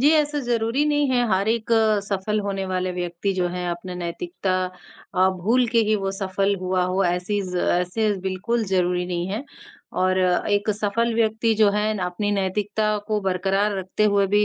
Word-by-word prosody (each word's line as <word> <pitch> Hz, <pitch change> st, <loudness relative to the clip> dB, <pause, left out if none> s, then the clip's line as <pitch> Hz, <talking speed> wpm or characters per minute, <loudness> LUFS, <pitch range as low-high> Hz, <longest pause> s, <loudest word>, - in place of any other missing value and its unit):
जी, 290 Hz, +4 st, +5 dB
ऐसा 295 Hz, -1 st, +2 dB
ज़रूरी 240 Hz, +2 st, 0 dB
नहीं 290 Hz, -1 st, +2 dB
है, 245 Hz, -1 st, +2 dB
हार 195 Hz, +2 st, +1 dB
एक 230 Hz, 0 st, -1 dB, 0.3 s
सफल 200 Hz, +1 st, -1 dB
होने 195 Hz, -1 st, -2 dB
वाले 185 Hz, 0 st, -1 dB
व्यक्ति 180 Hz, +2 st, -2 dB
जो 180 Hz, -1 st, 0 dB
है 180 Hz, 0 st, -4 dB
अपना 180 Hz, +1 st, -5 dB
नैतिकता 185 Hz, -, -3 dB, 0.6 s
अ, 185 Hz, 0 st, +4 dB
भूल 225 Hz, +8 st, +1 dB
के 235 Hz, -, +2 dB
ही 215 Hz, -, +4 dB
वो 195 Hz, -1 st, -2 dB
सफल 195 Hz, +1 st, 0 dB
हुआ 185 Hz, 0 st, 0 dB
हो 185 Hz, +1 st, +1 dB
ऐसे 180 Hz, +4 st, 0 dB
ज़ 180 Hz, -, -3 dB, 0.2 s
ऐसे 180 Hz, +5 st, 0 dB
बिल्कुल 195 Hz, +5 st, -1 dB
ज़रूरी 180 Hz, -1 st, +1 dB
नहीं 175 Hz, -1 st, -2 dB
है 215 Hz, +8 st, -3 dB, 0.6 s
और 185 Hz, 0 st, +2 dB
एक 205 Hz, +3 st, +1 dB
सफल 230 Hz, +3 st, 0 dB
व्यक्ति 225 Hz, 0 st, +2 dB
जो 210 Hz, -1 st, +4 dB
है 210 Hz, +1 st, 0 dB
अपनी 180 Hz, +4 st, -2 dB
नैतिकता 205 Hz, +2 st, 0 dB
को 215 Hz, -1 st, +1 dB
बरकरार 195 Hz, +2 st, 0 dB
रखते 190 Hz, +3 st, -1 dB
हुए 200 Hz, -1 st, +3 dB
भी 205 Hz, +2 st, +3 dB
200 Hz, 180 wpm, -23 LUFS, 185-220 Hz, 0.6 s, जी